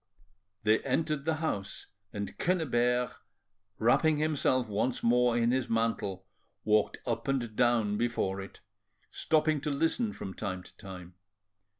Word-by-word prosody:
They 110 +1 +4
entered 150 +1 -1
the 160 0 +1
house, 125 -12 -3 0.3
and 100 -1 -5
Quennebert, 125 -8 +1 0.6
wrapping 150 +7 +3
himself 145 -5 +1
once 110 +4 -1
more 120 0 +3
in 120 0 +3
his 130 -1 0
mantle, 110 -4 -1 0.4
walked 105 0 +2
up 115 0 -2
and 120 -5 -1
down 115 -4 +2
before 100 -5 -1
it, 95 - -11 0.5
stopping 155 -2 +1
to 150 - -2
listen 165 - 0
from 95 - -7
time 95 -3 -4
to - - -16
time. 90 -2 -10
120 Hz, 130 wpm, -30 LUFS, 105-145 Hz, 0.6 s, They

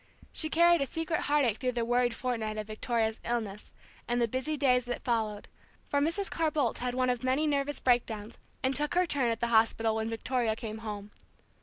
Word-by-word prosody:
She 315 - -1
carried 340 0 +5
a 275 - 0
secret 325 +2 -2
heartache 280 -7 +2
through 250 -1 -1
the 235 -1 -1
worried 245 0 +2
fortnight 225 -4 -2
of 215 - -3
Victoria's 220 +1 -1
illness, 220 -4 -3 0.4
and 240 0 +1
the 235 - +3
busy 260 +6 -2
days 250 -3 +4
that 245 - -4
followed; 220 -4 -1 0.4
for 285 - +2
Mrs. 335 +7 0
Carr 325 -1 0
Boldt 285 -6 0
had 250 0 -2
one 255 0 +2
of 245 -1 -3
many 260 +4 +2
nervous 285 -1 0
break 245 -2 +3
downs, 215 0 -7 0.2
and 260 +1 +1
took 295 +4 0
her 360 0 +4
turn 275 -7 +1
at 225 -1 -2
the 235 - +1
hospital 225 0 +3
when 220 0 -2
Victoria 230 0 -1
came 220 -1 -6
home. 210 -2 -6
245 Hz, 205 wpm, -30 LUFS, 225-285 Hz, 0.4 s, carried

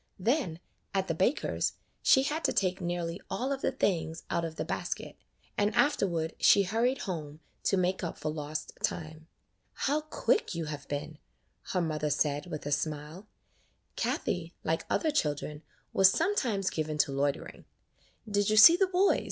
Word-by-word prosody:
Then 220 - 0 0.4
at 190 -1 +1
the 165 - 0
baker's 190 - 0 0.3
she 265 - +5
had 305 +4 -2
to - - +3
take 185 -1 0
nearly 175 0 -3
all 260 +3 -2
of 275 -1 -2
the - - +1
things 170 -10 -1
out 170 - 0
of 165 -1 -4
the - - -3
basket, - - -4 0.4
and 205 +1 +1
afterward 170 - +1
she 200 - +6
hurried 230 +7 +1
home, 155 -5 -5 0.3
to 195 - +3
make 185 +1 0
up 170 - -4
for 155 - -3
lost 150 0 -5
time. 160 -1 -3 0.5
"How 295 +2 0
quick 365 - 0
you 165 -1 -2
have 150 -2 -6
been," 145 +2 -5 0.5
her 180 - +2
mother 155 -2 -1
said, 145 +1 0
with 155 -4 -6
a 145 - -3
smile. 155 +6 -3 0.7
Kathie, 170 -1 -2
like 160 +1 -1
other 315 - +1
children 150 - -1 0.3
was 195 0 +7
sometimes 230 - 0
given 155 -1 -2
to 145 - +2
loitering. 140 +1 -2 0.6
"Did 205 -1 +1
you 215 - +2
see 330 +10 +11
the 385 0 +3
boys?" 375 +2 +3
175 Hz, 165 wpm, -30 LUFS, 155-220 Hz, 0.7 s, see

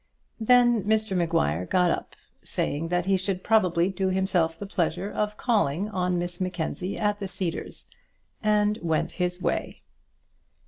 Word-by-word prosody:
Then 240 -1 +4
Mr 215 -2 +1
Maguire 90 - +1
got 180 -2 +3
up, - - -4 0.3
saying 155 +3 -2
that 175 +1 0
he 195 0 +3
should 185 0 -2
probably 180 -5 +3
do 190 0 -1
himself 185 -3 +1
the 200 - -6
pleasure 180 +1 -1
of 210 0 -2
calling 205 - +1
on 180 -3 0
Miss 175 +1 -4
Mackenzie 180 +1 -3
at 210 -1 0
the 200 - -3
Cedars, 180 -3 -5 0.6
and 210 0 +2
went 160 -2 0
his 180 0 0
way. - - -2
185 Hz, 145 wpm, -26 LUFS, 175-210 Hz, 0.6 s, Then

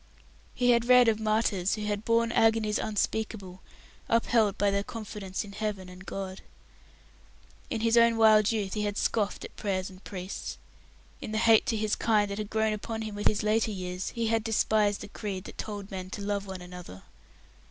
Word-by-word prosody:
He 245 -1 +3
had 235 -1 +3
read 250 -1 +7
of 220 -1 +2
martyrs 215 -4 +1
who 215 - -5
had 205 0 -2
borne 230 0 +2
agonies 225 -2 +3
unspeakable, 210 -3 -2 0.5
upheld 230 -3 +2
by 205 0 +2
their 200 0 0
confidence 205 -4 -5
in 205 - -10
Heaven 200 -3 -4
and 185 +1 -12
God. 190 -1 -5 1.3
In 220 - -2
his 230 0 +3
old 230 0 +5
wild 215 -1 +5
youth 205 -4 -2
he 210 - -1
had 205 0 -2
scoffed 205 -3 0
at - - -12
prayers 190 -2 -2
and 185 +1 -15
priests; 185 0 -6 0.6
in 215 - -6
the - - 0
hate 225 0 +5
to 225 - +1
his 215 -1 0
kind 210 -3 +2
that 200 - -4
had 210 -1 -4
grown 220 0 +1
upon 220 +1 -4
him 215 -1 -5
with 205 0 0
his 210 - +1
later 220 +1 +2
years 180 -2 -4
he 230 -1 -2
had 225 0 +1
despised 215 -2 +1
a - - -7
creed 200 -3 -5
that - - -11
told 205 -2 -6
men 185 -1 -5
to 205 - -6
love 200 0 -2
one 190 -2 -7
another. 180 - -10
210 Hz, 195 wpm, -28 LUFS, 195-220 Hz, 1.3 s, read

